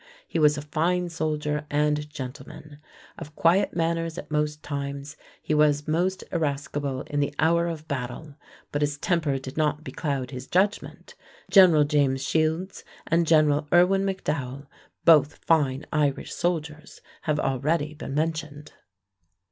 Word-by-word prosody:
He - - -2
was 150 -1 +4
a 145 - -5
fine 175 +4 0
soldier 150 -2 -2
and 150 0 0
gentleman. 145 +2 -9 0.4
Of 150 +1 -10
quiet 175 +4 +2
manners 165 0 -1
at - - -8
most 150 0 -1
times, 140 0 -5 0.3
he - - -1
was 150 -1 +3
most 180 +5 0
irascible 145 -3 -2
in 145 - -3
the 145 0 -1
hour 170 +1 +2
of 160 -2 -6
battle, 135 +3 -5 0.4
but 145 - -2
his 145 0 0
temper 155 -4 0
did 135 +1 -8
not 150 -1 0
becloud 140 -6 -3
his 130 0 -7
judgment. 200 +3 -1 0.4
General 180 -6 +7
James 140 -3 +1
Shields 160 +6 -1 0.2
and 165 0 +1
General 150 -2 +3
Irwin 180 +2 +5
McDowell, 150 -8 -3 0.4
both 150 -3 +6
fine 145 -4 +2
Irish 145 -3 0
soldiers, 160 -3 -3 0.2
have 150 -1 0
already 150 +4 0
been 150 -2 -6
mentioned. 155 -1 -3
150 Hz, 140 wpm, -25 LUFS, 145-165 Hz, 0.4 s, General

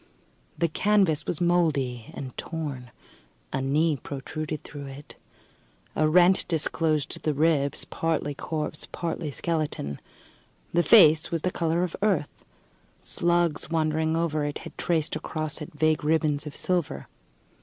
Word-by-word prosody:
The 170 - +2
canvas 190 -2 +2
was 165 - -1
mouldy 150 -9 +1
and 130 -2 -7
torn. 145 -7 -5 0.6
A 135 - 0
knee 150 +3 +2
protruded 150 +3 -5
through 145 -1 -8
it. 135 +2 -10 0.8
A 155 - +3
rent 180 +3 +5
disclosed 155 -2 0
the 155 -2 0
ribs 145 -2 +2
partly 160 -3 -1
corpse, 150 +1 -4
partly 165 -2 -3
skeleton. 150 - -2 0.7
The 170 - +4
face 160 -6 +6
was 165 -2 -2
the 185 - +1
colour 170 0 0
of 180 - -3
earth; 190 -8 0 0.6
slugs, 170 -3 +1
wandering 160 0 +1
over 155 -3 0
it, 145 0 -2
had - - -9
traced 165 -3 0
across 155 -1 -3
it 150 - -7
vague 155 0 +2
ribbons 150 -1 +1
of 145 - -7
silver. 180 -4 -1
155 Hz, 135 wpm, -26 LUFS, 145-170 Hz, 0.8 s, face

